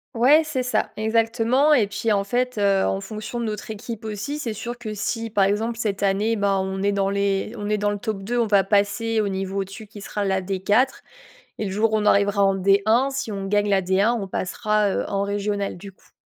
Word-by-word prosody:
Ouais, 265 Hz, +7 st, +6 dB
c'est 270 Hz, -5 st, -2 dB
ça 245 Hz, -4 st, 0 dB
exactement 225 Hz, +5 st, +2 dB
et 250 Hz, -8 st, +5 dB
puis 205 Hz, +3 st, -2 dB
en 200 Hz, -1 st, +2 dB
fait, 250 Hz, +4 st, -1 dB
heu, 200 Hz, -1 st, +3 dB
en 195 Hz, -, 0 dB
fonction 215 Hz, +4 st, -6 dB
de 235 Hz, -, -2 dB
notre 210 Hz, -1 st, -5 dB
équipe 220 Hz, +1 st, -7 dB
aussi 220 Hz, +8 st, -4 dB
c'est 235 Hz, -7 st, -3 dB
sûr 240 Hz, +3 st, -5 dB
que 215 Hz, -3 st, -5 dB
si 225 Hz, +2 st, -3 dB
par 205 Hz, -2 st, +2 dB
exemple 220 Hz, +4 st, 0 dB
cette 210 Hz, -4 st, -2 dB
année, 205 Hz, +3 st, +1 dB
bah, 200 Hz, -2 st, +1 dB
on 190 Hz, 0 st, -4 dB
est 200 Hz, +1 st, +2 dB
dans 195 Hz, -1 st, 0 dB
les 200 Hz, +1 st, 0 dB
on 205 Hz, -1 st, -4 dB
est 210 Hz, -, +1 dB
dans 205 Hz, 0 st, 0 dB
le 205 Hz, -, -4 dB
top 210 Hz, -3 st, -4 dB
2 240 Hz, +4 st, -1 dB
on 230 Hz, -, +2 dB
va 200 Hz, -2 st, +4 dB
passer 210 Hz, +3 st, +1 dB
au 210 Hz, -, -1 dB
niveau 195 Hz, 0 st, -2 dB
au -, -, 0 dB
dessus 200 Hz, +3 st, -10 dB
qui 205 Hz, 0 st, -12 dB
sera 205 Hz, +1 st, -3 dB
la 190 Hz, -1 st, +1 dB
D4. 195 Hz, +6 st, +2 dB, 0.7 s
Et 215 Hz, -, -3 dB
le 195 Hz, -, -3 dB
jour 215 Hz, +3 st, +1 dB
où -, -, +4 dB
on 210 Hz, -, -1 dB
arrivera 200 Hz, 0 st, +3 dB
en 195 Hz, -, +3 dB
D1, 200 Hz, +7 st, +3 dB
si 265 Hz, -4 st, -3 dB
on 195 Hz, -1 st, -4 dB
gagne 205 Hz, +1 st, +1 dB
la 195 Hz, -1 st, +3 dB
D1, 190 Hz, +5 st, +2 dB
on 195 Hz, -, -4 dB
passera, 210 Hz, +3 st, 0 dB
heu, -, -, -1 dB
en 200 Hz, 0 st, 0 dB
régionale 200 Hz, 0 st, -2 dB
du 195 Hz, +2 st, -10 dB
coup. 190 Hz, -, -28 dB
205 Hz, 240 wpm, -23 LUFS, 195-225 Hz, 0.7 s, Ouais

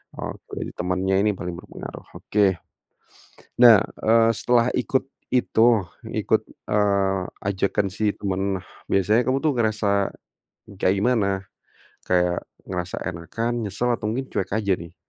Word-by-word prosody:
Oke, -, -, -7 dB, 0.2 s
temannya 95 Hz, +2 st, 0 dB
ini 105 Hz, -, +4 dB
paling 90 Hz, -2 st, -5 dB
berpengaruh, -, -, -9 dB
oke. 105 Hz, -1 st, +2 dB, 1.1 s
Nah, 115 Hz, -5 st, +8 dB
eee, 115 Hz, 0 st, +2 dB
setelah 120 Hz, 0 st, +3 dB
ikut 135 Hz, -2 st, 0 dB, 0.3 s
itu, 120 Hz, -1 st, +4 dB, 0.5 s
ikut, -, -, +2 dB, 0.3 s
eee, 100 Hz, -2 st, +2 dB, 0.3 s
ajakan 100 Hz, +1 st, 0 dB
si 105 Hz, +2 st, 0 dB
teman, 95 Hz, -1 st, -2 dB, 0.2 s
biasanya 105 Hz, +5 st, +2 dB
kamu 135 Hz, +3 st, +1 dB
tuh 155 Hz, -, +3 dB
ngerasa 105 Hz, -3 st, +1 dB, 0.7 s
kayak 95 Hz, +2 st, +3 dB
gimana, 100 Hz, -3 st, +1 dB, 0.6 s
kayak 90 Hz, -1 st, +2 dB, 0.3 s
ngerasa 90 Hz, 0 st, -3 dB
enakan, 115 Hz, +7 st, -3 dB
nyesel 120 Hz, +5 st, -1 dB
atau 115 Hz, -3 st, -1 dB
mungkin 130 Hz, +5 st, -3 dB
cuek 95 Hz, -1 st, -2 dB
aja 100 Hz, -3 st, +2 dB
nih? 85 Hz, 0 st, -10 dB
100 Hz, 125 wpm, -24 LUFS, 95-115 Hz, 1.1 s, Nah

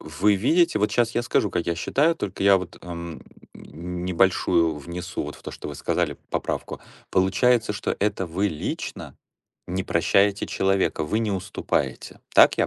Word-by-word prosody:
вы 80 Hz, +7 st, +1 dB
видите, 165 Hz, -, +3 dB
вот 105 Hz, +1 st, +1 dB
щас 115 Hz, +2 st, +2 dB
я 120 Hz, -, +1 dB
скажу, 105 Hz, -3 st, +1 dB
как 85 Hz, -, -2 dB
я 85 Hz, -, +1 dB
считаю, 150 Hz, -, +2 dB
только 100 Hz, -, -4 dB
я 100 Hz, -1 st, +7 dB
вот, 90 Hz, -2 st, -6 dB
ам, 85 Hz, -2 st, -7 dB, 0.3 s
ни 90 Hz, +3 st, -6 dB
небольшую 85 Hz, -3 st, +3 dB
внесу 85 Hz, +4 st, -5 dB
вот 75 Hz, -, -6 dB
в -, -, -16 dB
то, -, -, -6 dB
что -, -, -8 dB
вы 75 Hz, -, -6 dB
сказали, -, -, -1 dB
поправку. -, -, -3 dB, 0.3 s
Получается, 105 Hz, +5 st, +3 dB
что 105 Hz, -, -2 dB
это 100 Hz, -2 st, 0 dB
вы 95 Hz, +5 st, 0 dB
лично 75 Hz, -5 st, -5 dB, 0.5 s
не 95 Hz, +1 st, -2 dB
прощаете 100 Hz, +4 st, +2 dB
человека, 95 Hz, -4 st, +1 dB
вы 105 Hz, +9 st, 0 dB
не 110 Hz, -2 st, 0 dB
уступаете, 95 Hz, +1 st, -3 dB
так -, -, +7 dB
я -, -, +2 dB
95 Hz, 170 wpm, -24 LUFS, 85-105 Hz, 0.5 s, я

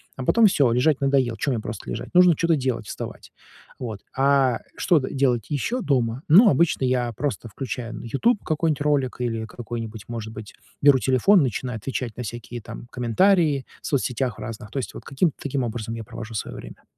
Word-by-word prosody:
а 130 Hz, -, -5 dB
потом 230 Hz, -, +5 dB
всё, 140 Hz, -, +3 dB
лежать 130 Hz, +4 st, +2 dB
надоел. 135 Hz, -4 st, +2 dB
Чё 140 Hz, -, -1 dB
мне 120 Hz, -, 0 dB
просто 110 Hz, -1 st, -7 dB
лежать? -, -, -5 dB
Нужно 180 Hz, -2 st, +6 dB
чё-то 170 Hz, +2 st, +2 dB
делать, 130 Hz, -6 st, -2 dB
вставать, -, -, -7 dB, 0.5 s
вот. 110 Hz, -5 st, -5 dB
А 135 Hz, -3 st, +3 dB, 0.2 s
что 170 Hz, -4 st, +3 dB
делать 130 Hz, -4 st, 0 dB
ещё 225 Hz, -, -1 dB
дома? 125 Hz, -, 0 dB
Ну, 200 Hz, +8 st, +8 dB
обычно 150 Hz, -2 st, +2 dB
я 125 Hz, -2 st, +1 dB
просто 125 Hz, -1 st, -3 dB
включаю 120 Hz, +1 st, -5 dB
на -, -, -8 dB
"Ютуб" 205 Hz, -, +1 dB
какой-нибудь 155 Hz, -2 st, 0 dB
ролик 145 Hz, -4 st, +1 dB
или 115 Hz, -2 st, -2 dB
какой-нибудь, 115 Hz, -2 st, -7 dB
может 115 Hz, -2 st, -5 dB
быть, 110 Hz, -1 st, -9 dB, 0.3 s
беру 140 Hz, -2 st, +6 dB
телефон, 135 Hz, -, +4 dB
начинаю 125 Hz, -1 st, -2 dB
отвечать 120 Hz, 0 st, -4 dB
на 125 Hz, -, -4 dB
всякие 120 Hz, +1 st, -7 dB
там 115 Hz, -, -9 dB
комментарии 145 Hz, -, +2 dB, 0.2 s
в -, -, -6 dB
соцсетях 125 Hz, -3 st, -1 dB
разных, 110 Hz, -1 st, -7 dB
то 140 Hz, -, -6 dB
есть 130 Hz, -, -3 dB
вот -, -, -9 dB
каким-то 145 Hz, +3 st, 0 dB
таким 140 Hz, -2 st, -1 dB
образом 115 Hz, -1 st, -4 dB
я 115 Hz, -, -6 dB
провожу 115 Hz, 0 st, -8 dB
своё 105 Hz, -, -4 dB
время. -, -, -11 dB
130 Hz, 185 wpm, -24 LUFS, 115-145 Hz, 0.5 s, Ну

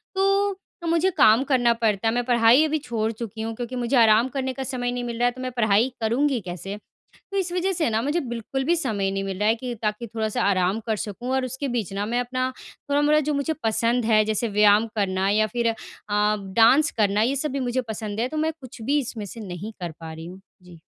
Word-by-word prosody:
तो 395 Hz, +1 st, +2 dB, 0.3 s
तो 335 Hz, -, -5 dB
मुझे 335 Hz, +3 st, +3 dB
काम 220 Hz, +4 st, +6 dB
करना 250 Hz, -4 st, +3 dB
पड़ता 225 Hz, -2 st, 0 dB
है 225 Hz, -, +2 dB
मैं 245 Hz, 0 st, 0 dB
पढ़ाई 240 Hz, +3 st, +5 dB
अभी 310 Hz, 0 st, 0 dB
छोड़ 225 Hz, -5 st, -2 dB
चुकी 220 Hz, 0 st, -7 dB
हूँ 225 Hz, 0 st, -3 dB
क्योंकि 245 Hz, +1 st, -5 dB
मुझे 245 Hz, +2 st, -1 dB
आराम 225 Hz, +1 st, +5 dB
करने 265 Hz, -1 st, -3 dB
का 265 Hz, -, -5 dB
समय 245 Hz, -1 st, -2 dB
नहीं 245 Hz, 0 st, -3 dB
मिल 235 Hz, -1 st, -4 dB
रहा 245 Hz, -, +3 dB
है 245 Hz, -, +3 dB
तो 255 Hz, +1 st, -10 dB
मैं 255 Hz, 0 st, -3 dB
पढ़ाई 220 Hz, +1 st, +2 dB
करूँगी 250 Hz, +3 st, +1 dB
कैसे? 185 Hz, +2 st, -6 dB, 0.6 s
तो 395 Hz, -, -4 dB
इस 355 Hz, -2 st, -2 dB
वज़ह 365 Hz, +2 st, 0 dB
से 330 Hz, -7 st, 0 dB
ना 220 Hz, +1 st, +1 dB
मुझे 295 Hz, +6 st, 0 dB
बिल्कुल 245 Hz, +2 st, -4 dB
भी 345 Hz, +3 st, +2 dB
समय 210 Hz, -, -1 dB
नहीं 195 Hz, 0 st, -2 dB
मिल 195 Hz, -1 st, -4 dB
रहा 210 Hz, +1 st, +2 dB
है 225 Hz, -, +4 dB
कि 245 Hz, +1 st, -5 dB
ताकि 215 Hz, +2 st, -2 dB
थोड़ा-सा 220 Hz, -1 st, -2 dB
आराम 190 Hz, +2 st, +1 dB
कर 220 Hz, -1 st, 0 dB
सकूँ 225 Hz, +5 st, -5 dB
और 265 Hz, -, +1 dB
उसके 265 Hz, +2 st, -4 dB
बीच 230 Hz, -6 st, -2 dB
ना 200 Hz, +1 st, -2 dB
मैं 240 Hz, +2 st, 0 dB
अपना 255 Hz, +1 st, -1 dB, 0.4 s
थोड़ा-मोड़ा 295 Hz, +1 st, +3 dB
जो 300 Hz, 0 st, -1 dB
मुझे 280 Hz, +3 st, 0 dB
पसंद 230 Hz, +2 st, +1 dB
है 215 Hz, -1 st, +4 dB
जैसे 220 Hz, +2 st, -1 dB
व्यायाम 210 Hz, +1 st, +4 dB
करना 190 Hz, -1 st, 0 dB
या 215 Hz, +1 st, +3 dB
फिर 235 Hz, +1 st, -1 dB
अ, 225 Hz, -, 0 dB, 0.4 s
डांस 210 Hz, +7 st, +3 dB
करना 205 Hz, 0 st, +2 dB
ये 265 Hz, +4 st, +1 dB
सब 300 Hz, +2 st, -1 dB
भी 275 Hz, -, -2 dB
मुझे 250 Hz, 0 st, 0 dB
पसंद 215 Hz, -1 st, -4 dB
है 245 Hz, -, 0 dB
तो 310 Hz, -, -6 dB
मैं 315 Hz, +1 st, 0 dB
कुछ 255 Hz, -2 st, -11 dB
भी 280 Hz, +6 st, +1 dB
इसमें 235 Hz, -5 st, -5 dB
से 225 Hz, +4 st, -9 dB
नहीं 185 Hz, +5 st, -6 dB
कर 170 Hz, -2 st, -4 dB
पा 160 Hz, -1 st, -7 dB
रही 160 Hz, +1 st, -9 dB
हूँ। 185 Hz, +2 st, -10 dB, 0.2 s
जी। 175 Hz, -2 st, -15 dB
235 Hz, 240 wpm, -24 LUFS, 210-265 Hz, 0.6 s, काम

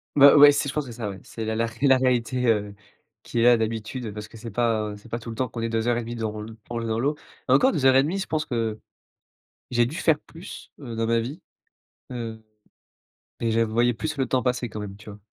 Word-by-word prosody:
Bah, 140 Hz, 0 st, +8 dB
ouais, 145 Hz, 0 st, +9 dB
si, 145 Hz, 0 st, 0 dB
je 140 Hz, -, -3 dB
pense 150 Hz, -2 st, -1 dB
que -, -, -8 dB
c'est 115 Hz, -, -11 dB
ça, 110 Hz, -4 st, -3 dB
ouais, 95 Hz, -, -8 dB
c'est 110 Hz, -1 st, -6 dB
la 110 Hz, 0 st, -1 dB
la 115 Hz, -, +1 dB
ré 115 Hz, -, -11 dB
c'est 140 Hz, -, +3 dB
la 130 Hz, -1 st, +6 dB
réalité, 125 Hz, -1 st, +1 dB
heu, 105 Hz, -2 st, +1 dB, 0.5 s
qui 120 Hz, -, -3 dB
est 115 Hz, -, +3 dB
là 120 Hz, -1 st, +7 dB
d'habitude, 110 Hz, +1 st, -3 dB
parce 105 Hz, 0 st, -7 dB
que 115 Hz, -, -14 dB
c'est 115 Hz, +1 st, -7 dB
pas 110 Hz, -2 st, 0 dB
c'est 105 Hz, -, -16 dB
pas 115 Hz, -, -3 dB
tout 115 Hz, -, -9 dB
le 115 Hz, -, -6 dB
temps 130 Hz, +2 st, -1 dB
qu'on 115 Hz, -, -6 dB
est 115 Hz, -, -1 dB
2 115 Hz, +1 st, -1 dB
heures 120 Hz, -1 st, +2 dB
et -, -, 0 dB
demie 120 Hz, +1 st, -6 dB
dans 110 Hz, -2 st, -4 dB
l 110 Hz, 0 st, -9 dB
qu'on 120 Hz, -1 st, -3 dB
est 115 Hz, -, -3 dB
dans 110 Hz, 0 st, -1 dB
l'eau. 145 Hz, +4 st, +1 dB, 0.3 s
Encore 135 Hz, -, +5 dB
2 145 Hz, -6 st, -1 dB
heures 130 Hz, 0 st, +6 dB
et 135 Hz, -, +7 dB
demie, 170 Hz, +7 st, -1 dB
je 195 Hz, -, -2 dB
pense 155 Hz, -1 st, -2 dB
que 115 Hz, -3 st, -2 dB, 0.9 s
j'ai 120 Hz, -1 st, +3 dB
dû 155 Hz, +6 st, -6 dB
faire 155 Hz, -3 st, +2 dB
plus, 170 Hz, +4 st, -11 dB
heu, 120 Hz, -5 st, -7 dB
dans 115 Hz, 0 st, 0 dB
ma 115 Hz, 0 st, +2 dB
vie, 135 Hz, +10 st, -6 dB, 0.7 s
hem, 115 Hz, -3 st, -6 dB, 1.0 s
mais 115 Hz, -, 0 dB
j'a 115 Hz, +1 st, +3 dB
voyais 120 Hz, +3 st, +2 dB
plus 155 Hz, +6 st, -4 dB
le 135 Hz, -2 st, 0 dB
temps 125 Hz, 0 st, +1 dB
passer 125 Hz, -1 st, -1 dB
quand 105 Hz, -, -6 dB
même, 100 Hz, -1 st, -7 dB
tu 105 Hz, 0 st, -12 dB
vois? 100 Hz, -, -11 dB
115 Hz, 275 wpm, -25 LUFS, 110-130 Hz, 1.0 s, ouais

